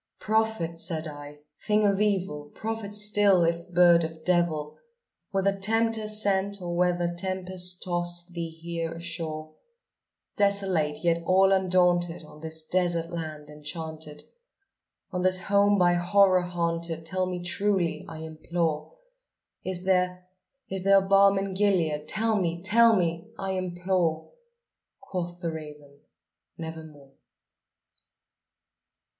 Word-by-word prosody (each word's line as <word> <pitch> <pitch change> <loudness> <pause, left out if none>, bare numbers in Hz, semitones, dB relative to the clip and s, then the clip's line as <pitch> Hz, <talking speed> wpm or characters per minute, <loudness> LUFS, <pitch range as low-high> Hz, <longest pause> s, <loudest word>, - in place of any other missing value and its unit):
"Prophet!" 220 -7 0
said 165 -1 -1
I, 145 0 -10 0.3
"thing 210 0 +3
of 200 0 +2
evil! 190 -8 0
prophet 220 -2 -4
still, 205 -3 +4
if 170 +1 -1
bird 175 -1 +5
or - - 0 0.2
devil! 165 -4 0 0.5
Whether 195 0 +1
Tempter 220 +2 0
sent, 200 -1 +1
or 175 -2 -4
whether 175 -1 +1
tempest 180 0 -2
tossed 175 0 -3
thee 170 -1 -4
here 165 0 -5
ashore, 160 -2 -6 0.8
Desolate 190 -7 +1
yet 170 -1 +2
all 190 +2 +4
undaunted, 180 -3 +2
on 150 0 -14
this 160 0 -5
desert 175 -1 0
land 155 -3 -6
enchanted 150 0 -7 0.9
On 180 - -2
this 185 0 +3
home 200 +2 +3
by 175 -2 +4
Horror 185 +1 +4
haunted 170 -2 -2
tell 185 +2 0
me 180 -1 -4
truly, 175 -3 0
I 160 -1 -8
implore 160 - -3 0.7
Is 185 -1 -4
there 180 -1 +1 0.4
is 190 0 -4
there 195 +1 +5
balm 195 +1 +5
in 195 0 -2
Gilead? 170 -7 +1
tell 220 0 +1
me 170 0 -2
tell 230 +3 +5
me, 170 +1 -1
I 195 -1 -3
implore!" 180 -3 -1 0.7
Quoth 175 -1 -5
the 170 -2 -2
raven, 150 -2 -10 0.6
"Nevermore." 160 -4 -9
175 Hz, 120 wpm, -27 LUFS, 165-195 Hz, 0.9 s, bird